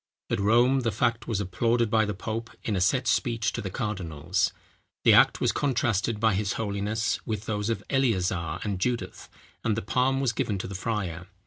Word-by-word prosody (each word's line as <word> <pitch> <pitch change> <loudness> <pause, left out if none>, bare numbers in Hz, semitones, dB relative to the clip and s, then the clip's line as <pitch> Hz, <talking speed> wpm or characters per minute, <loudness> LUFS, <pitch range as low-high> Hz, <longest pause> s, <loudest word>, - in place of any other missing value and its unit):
At - - +1
Rome, 120 +6 +4
the 120 -3 0
fact 115 +3 0
was 110 -4 -1
applauded 115 +4 +1
by 110 -1 +4
the 105 -1 -3
pope 110 +4 -4
in 105 - -1
a 95 - 0
set 125 +8 +2
speech 115 -1 +1
to - - -3
the 100 - -4
cardinals. 90 -8 -1 0.5
The - - +7
act - - +6
was - - +2
contrasted 115 -5 0
by 110 -1 +3
his 100 +1 0
holiness, 105 +1 -1
with 110 -1 -4
those 105 0 -2
of 110 -3 -2
Eleazar 95 - 0
and 100 -3 -2
Judith, 120 +3 -2 0.3
and 110 -2 +1
the 115 - -2
palm 130 +1 +1
was 130 -4 +1
given 105 -2 -1
to 95 - -5
the 100 - -7
friar. 95 -4 -3
110 Hz, 195 wpm, -27 LUFS, 100-115 Hz, 0.5 s, The